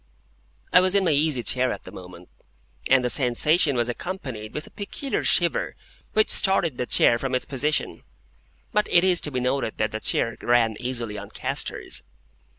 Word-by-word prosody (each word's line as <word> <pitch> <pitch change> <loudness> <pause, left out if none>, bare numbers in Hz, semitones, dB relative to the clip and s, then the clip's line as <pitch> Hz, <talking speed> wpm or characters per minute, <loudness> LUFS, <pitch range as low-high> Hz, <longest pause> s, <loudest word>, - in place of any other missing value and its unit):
I - - +8
was 185 +1 +1
in 195 -1 +3
my 165 - +3
easy 145 -4 +1
chair 125 +4 +1
at - - -6
the - - -11
moment, 90 -1 -12 0.6
and 130 -1 +4
the - - +1
sensation 145 +4 +2
was 120 -1 0
accompanied 120 - -6
with 150 - -5
a - - -15
peculiar 260 +7 -4
shiver - - +1 0.4
which 215 0 +3
started 175 -8 +1
the 125 - -2
chair 115 - +4
from 135 0 -2
its 130 - -2
position. 150 +3 -2 0.7
(But 210 -1 +2
it 175 - +4
is 185 -2 +4
to 150 - -3
be 130 - -2
noted 125 -2 -1
that 110 - 0
the 110 - -4
chair 115 +1 0
ran 120 -2 +2
easily 120 -4 -4
on 100 - -10
castors.) - - -4
130 Hz, 180 wpm, -24 LUFS, 120-170 Hz, 0.7 s, I